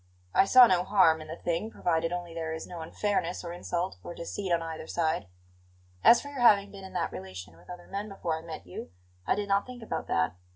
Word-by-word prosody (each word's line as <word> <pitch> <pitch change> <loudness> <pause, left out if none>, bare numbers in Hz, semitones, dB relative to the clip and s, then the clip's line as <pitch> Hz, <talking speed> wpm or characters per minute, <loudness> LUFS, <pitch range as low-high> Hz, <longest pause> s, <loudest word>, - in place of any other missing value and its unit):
I - - +5
saw 255 +4 +9
no 185 -5 +3
harm 185 -5 +4
in 155 - -9
the 160 - -6
thing, 170 +6 -2
provided 165 -5 0
only 175 -1 -4
there 165 -1 -3
is 160 - -5
no 175 -2 -8
unfairness 180 +1 -1
or 170 -1 -5
insult 175 +1 -3
or 175 - -7
deceit 185 +2 -4
on 170 -1 +2
either 160 -1 -6
side. 160 - -1 0.8
As 235 - +8
for 285 - -8
your 280 -3 -5
having 205 -4 +5
been 195 -1 -10
in 190 0 -10
that 180 - -1
relation 95 +1 -8
with - - -20
other 180 -1 -9
men 200 +2 -5
before 170 -5 -3
I - - -11
met 165 -7 -8
you, 90 -2 -8 0.4
I - - +3
did 205 0 -3
not 200 +2 +1
think 250 -2 -9
about - - -4
that. 80 0 +1
175 Hz, 235 wpm, -29 LUFS, 160-200 Hz, 0.8 s, saw